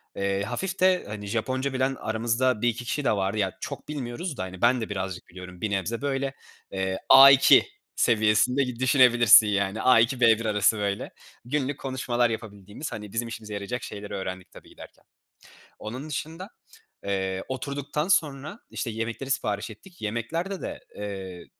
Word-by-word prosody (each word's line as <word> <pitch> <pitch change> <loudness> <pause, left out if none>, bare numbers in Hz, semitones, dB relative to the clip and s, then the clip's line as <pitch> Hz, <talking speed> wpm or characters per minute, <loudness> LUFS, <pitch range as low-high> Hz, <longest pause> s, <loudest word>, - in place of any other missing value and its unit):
eee, 100 0 -1
hafif 190 - -4
de, 185 0 +3
hani, 105 -1 -7
Japonca 130 +5 -2
bilen 130 +1 0
aramızda 115 +1 0
1-2 120 0 -1
kişi 145 +5 -2
de - - +3
vardı. 100 +1 -1
Ya, 95 -3 -1
çok 140 0 -7
bilmiyoruz 145 +2 -5
da, - - -3
hani, 95 -1 -8
ben 120 0 +3
de 110 - -4
birazcık 95 -3 -5
biliyorum, 90 0 -11
bir 105 - -2
nebze 100 +5 -2
böyle, 135 -1 -2 0.4
eee, 95 0 -2
A2 135 0 +9 0.3
seviyesinde 115 +4 +3
gi 125 -2 -5
düşünebilirsin, 120 -4 +6
yani, 100 +1 -1
A2, 125 +1 +4
B1 115 -1 +4
arası, 105 0 +2
böyle, 100 -1 -3 0.3
günlük 140 +1 -2
konuşmalar 125 -3 0
yapabildiğimiz, 105 +4 -7
hani, 105 -3 -8
bizim 115 +1 -2
işimize 110 -2 -8
yarayacak 100 +5 -4
şeyleri 105 0 -7
öğrendik 95 -2 -6
tabii - - -15
giderken. - - -14 0.8
Onun 130 +8 -7
dışında, 165 +6 -5 0.6
eee, 95 -1 -2
oturduktan 140 +3 -3
sonra, 155 +1 0
işte, 120 - -4
yemekleri 115 +4 -4
sipariş 105 -4 -2
ettik. 175 - -15
Yemeklerde 160 - -3
de, - - -6 0.2
eee, 95 -3 -7
115 Hz, 155 wpm, -26 LUFS, 100-135 Hz, 0.8 s, A2